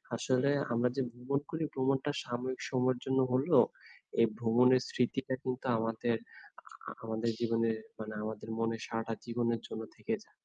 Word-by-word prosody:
আসলে 130 +3 +2 0.2
আমরা 120 +1 +3
যে 135 - +1
ভ্রমণ 125 +4 -1
করি, 160 0 -1
ভ্রমণটা 135 +2 +1
সাময়িক 125 +2 -3
সময়ের 130 -1 +2
জন্য 130 0 +2
হলেও 130 +2 +5 0.6
এই - - +8
ভ্রমণের 125 +2 +5
স্মৃতিটা 130 +1 0
কিন্তু 130 0 -3
আমাদের, 115 +1 0 0.5
আ - - -40 0.3
আ - - -5
আমাদের 110 +1 -1
জীবনের 115 -1 +2 0.2
মানে 110 0 -5
আমাদের 110 0 -5
মনে 115 0 +1
সারাটা 115 0 -2
জীবনের 115 -1 0
জন্য 110 - -5
থেকে - - -3
যায়। - - -28
120 Hz, 155 wpm, -33 LUFS, 115-130 Hz, 0.6 s, এই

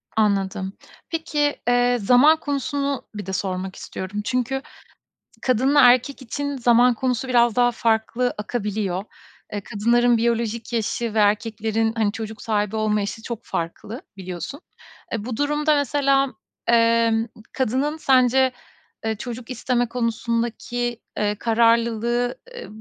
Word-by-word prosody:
Anladım. 195 -2 0 0.4
Peki, 300 -3 0
eee, 245 0 +3
zaman 255 +9 +6
konusunu 280 -2 -2
bir 205 -2 -5
de 190 - -5
sormak 190 0 -3
istiyorum. 190 +2 -5
Çünkü 255 +4 -1 0.8
kadınla 265 +4 +3
erkek 255 +2 +4
için 285 +3 -4
zaman 245 0 +5
konusu 250 +1 -1
biraz 240 -2 +3
daha 245 -1 +4
farklı 230 +2 0
akabiliyor. 205 -3 -2 0.5
Eee, 205 - -3
kadınların 235 +3 +2
biyolojik 235 0 -1
yaşı 230 0 -1
ve 220 - +1
erkeklerin 220 +1 +1
hani 215 -2 +2
çocuk 220 +1 -7
sahibi 210 -1 -1
olma 215 -1 +1
yaşı 205 +2 -4
çok 235 -2 -5
farklı. 205 - -5 0.2
Biliyorsun. 185 - -6 0.5
Eee, 220 -2 -3
bu 240 -2 -4
durumda 295 +1 +2
mesela, 275 -1 +2 0.4
eee, 230 -1 +3 0.3
kadının 265 +4 0
sence, 260 -2 +4 0.5
eee, 220 0 0
çocuk 240 +2 -7
isteme 245 0 0
konusundaki, 235 0 -2 0.2
eee, 210 0 0
kararlılığı, 235 +1 +2 0.2
eee, 485 - -8
235 Hz, 125 wpm, -23 LUFS, 215-255 Hz, 0.8 s, zaman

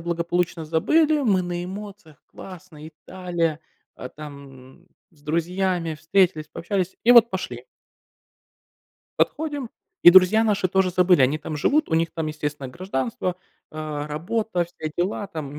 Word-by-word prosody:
благополучно 170 0 -2
забыли. 300 - +2
Мы 195 -6 +2
на 175 0 -4
эмоциях, 195 -6 -10
классно, 175 -4 -12
Италия, 170 -1 -3 0.4
э, 125 - -7
там 140 +1 -12 0.2
с 150 -5 -27
друзьями 170 +1 -1
встретились, 165 -1 +1
пообщались 185 +2 -3
и 235 - +4
вот 235 -1 +7
пошли. 125 -10 -5 1.6
Подходим, 290 -5 -1 0.3
и - - +10
друзья 190 +4 +6
наши 200 -3 +1
тоже 190 0 +1
забыли. 180 -2 +3
Они 130 +3 +3
там 155 0 -7
живут, 290 - +1
у - - +1
них 165 +1 +2
там, 160 -1 -4
естественно, 150 -3 -5
гражданство, 175 - -3 0.3
э, 155 -1 -5
работа, 180 +5 -2
все 165 -2 -7
дела. 190 +3 -2
Там, 150 -5 -7
175 Hz, 135 wpm, -23 LUFS, 155-190 Hz, 1.6 s, и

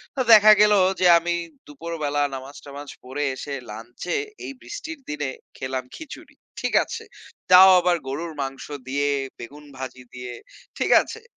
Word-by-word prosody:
তো 260 - 0
দেখা 215 0 +9
গেল 210 0 +6 0.3
যে, 185 - +2
আমি 175 +1 -2 0.3
দুপুরবেলা 145 -1 -3
নামাজ-টামাজ 140 +1 -10
পড়ে 130 +3 -4
এসে 140 +2 -7 0.2
লাঞ্চে 115 +10 -6 0.3
এই - - -5
বৃষ্টির 325 -7 -8
দিনে 145 -2 -3 0.3
খেলাম 130 -1 -4
খিচুড়ি। 315 -4 -11 0.2
ঠিক - - -3
আছে। - - -7 0.5
তাও 185 +1 +9
আবার 175 -1 +2
গরুর 160 +4 -4
মাংস 135 0 -5 0.2
দিয়ে 145 +2 0 0.3
বেগুন 145 +5 -11
ভাজি 130 -1 -8
দিয়ে, 125 -1 -7 0.4
ঠিক - - 0
আছে। 450 - -9
145 Hz, 145 wpm, -23 LUFS, 130-175 Hz, 0.5 s, দেখা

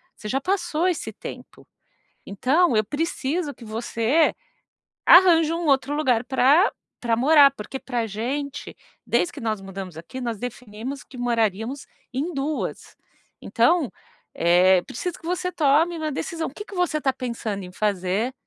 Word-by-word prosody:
você 215 - -9
já 270 - +1
passou 350 -1 0
esse 355 - -2
tempo, - - -10 0.6
então 265 - +2
eu 215 - +4
preciso 295 - -2
que 235 - -13
você 230 +6 +1 0.7
arranje 335 -3 +7
um 340 0 -2
outro 275 +1 +2
lugar 250 -6 +1
pra 275 - +4 0.3
pra 235 -2 +1
morar, 285 +2 +7
porque 265 +1 -7
pra 240 -3 -2
gente, 270 +7 -4 0.3
desde 345 - +1
que - - -8
nós 215 -3 -2
mudamos 195 -3 -8
aqui, 170 +11 -8
nós 235 -3 -3
definimos 245 +2 -6
que 255 - -14
moraríamos 230 +1 -1 0.3
em 295 +7 -2
duas. 290 +2 -4 0.5
Então, 335 -8 +2 0.4
eh, 180 +2 +4
preciso 350 - -5
que - - -15
você 360 +1 -1
tome 325 +1 +2
uma 310 -1 -2
decisão. 325 +3 -3
O - - -18
que 415 - -8
que 410 - -11
você 355 -4 0
tá 265 -2 +1
pensando 230 -6 -4
em 180 - -9
fazer 200 +4 -1
265 Hz, 155 wpm, -24 LUFS, 225-320 Hz, 0.7 s, arranje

